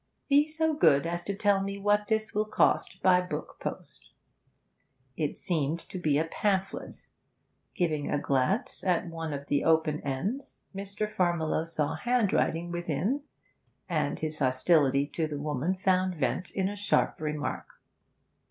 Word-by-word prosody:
'Be 290 +2 +5
so 320 0 0
good 140 - +4
as 170 +1 -2
to 200 - -2
tell 200 -1 +2
me 195 0 -3
what 205 +1 +2
this 220 +1 0
will 210 +1 0
cost 190 -3 +1
by 180 -1 +6
book 180 - -6
post.' - - -7 1.1
It 150 -3 -2
seemed 160 -1 -1
to 185 - -5
be 150 -4 +2
a 160 - +1
pamphlet. 195 +3 -2 0.7
Giving 155 -6 0
a - - +1
glance 140 - 0
at 180 -2 +1
one 165 -1 -5
of 140 -1 -5
the 145 0 +1
open 160 -2 +3
ends, 190 - -3
Mr. 200 +2 -3
Farmiloe 170 -5 0
saw 150 -3 -1
handwriting 200 -8 +1
within, 175 - -1 0.7
and - - 0
his 155 -1 -4
hostility 135 +1 +3
to 155 +2 -2
the 150 -1 -4
woman 150 +4 -1
found 185 -1 +1
vent 150 +4 -1
in 190 -1 -1
a 205 - -4
sharp 205 -5 +1
remark. 150 -1 -3
175 Hz, 150 wpm, -29 LUFS, 150-200 Hz, 1.1 s, by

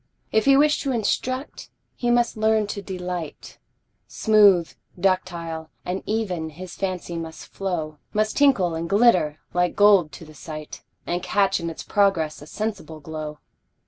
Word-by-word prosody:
If 220 0 +2
he 275 0 +6
wish 295 +1 +3
to 275 - -1
instruct, 255 +4 -2 0.3
he 240 - -1
must 240 0 +2
learn 220 0 +2
to 200 0 -5
delight, 180 -4 -6 0.5
Smooth, 205 -6 +4 0.3
ductile, 170 -4 -1 0.2
and 185 +2 -2
even, 185 -7 -2
his 175 +3 -9
fancy 185 -3 -4
must 160 -1 -7
flow, 160 -6 -3
Must 215 0 0
tinkle 245 -12 +3
and 165 +1 -4
glitter 185 -8 +4 0.2
like 180 0 +1
gold 200 -6 +5
to 165 - -10
the 155 - -14
sight, 155 0 -8 0.2
And 175 +1 -2
catch 195 +1 +1
in 170 -1 -3
its 165 - -7
progress 185 -8 +1
a 150 - -11
sensible 195 -6 -5
glow. 155 0 -6
185 Hz, 150 wpm, -24 LUFS, 160-215 Hz, 0.5 s, he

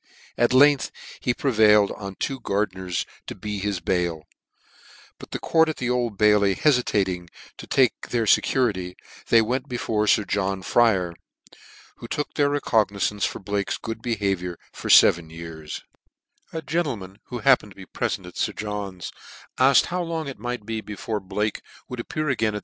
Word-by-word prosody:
At 120 0 +2
length 140 +2 +5 0.3
he 125 - 0
prevailed 110 -6 +4
on 100 -2 -7
two 135 +6 -3
fardeners 95 -3 -1 0.2
to - - -6
be 105 +1 -5
his 100 -1 -2
bail; 85 -3 -1 1.0
but - - -11
the - - -3
court 160 -1 +3
at 155 - -3
the 125 -1 -1
Old 120 -4 -1
ailey 105 -2 +4
hefitating 100 - +1 0.3
to - - -10
take 130 -4 +2
their 115 -2 0
fecurity, 100 -6 +2 0.3
they 115 - +6
wtnt 125 +5 -1
before 110 -4 -1
Sir 105 - +4
John 95 -1 -1
Fryer, 95 -6 +3 0.8
who 120 - -9
took 150 +4 -3
their 145 -1 +2
recog 125 -7 +2
nizance 100 0 -1
for - - -6
Blake's 100 0 -2
good 115 -1 -6
behaviour 100 -7 -1 0.2
for - - -6
feven 85 -2 +6
years 80 -1 -8 0.7
A 160 -1 -5
gentleman 125 - -3
who 125 - -6
happened 120 -6 +3
to - - -38
be 95 - -11
p - - -17
relent 95 - -1
at 90 - -11
Sir - - 0
John's, 100 -4 -5 0.5
afked 130 +1 +6
how 180 +1 -2
long 165 -3 -3
it 135 - -7
might 120 -3 -4
be 110 0 -3
before 105 +1 -4
Blake 105 +2 -2 0.3
would 125 - -6
appear 155 +6 -3
again 110 -6 +1
at. - - -2
105 Hz, 170 wpm, -24 LUFS, 95-125 Hz, 1.0 s, they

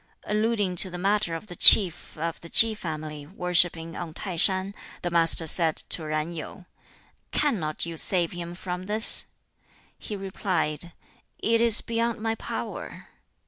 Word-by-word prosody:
Alluding 210 -3 -1
to 185 - 0
the 180 - -7
matter 195 -2 -1
of 165 - -8
the 180 -4 -10
Chief 180 -5 +6
of 165 +1 -5
the 170 - -11
Ki 225 +5 +5
family 155 -6 -7
worshipping 170 -2 +2
on 165 -2 -8
Tai 190 -4 -6
shan, 190 +3 0 0.3
the 175 - -3
Master 165 -1 +3
said 160 0 +4
to 160 -3 -3
Yen 155 +2 -3
Yu, 170 +3 -9 0.6
"Cannot 180 - -2
you 165 -1 -7
save 175 0 +1
him 175 0 -8
from 180 0 -7
this?" 215 +2 +3 0.7
He 210 - -7
replied, 180 -4 -4 0.4
"It 230 +1 0
is 230 -2 +6
beyond 230 0 -3
my 225 +1 -2
power." - - -8
180 Hz, 150 wpm, -25 LUFS, 165-210 Hz, 0.7 s, Chief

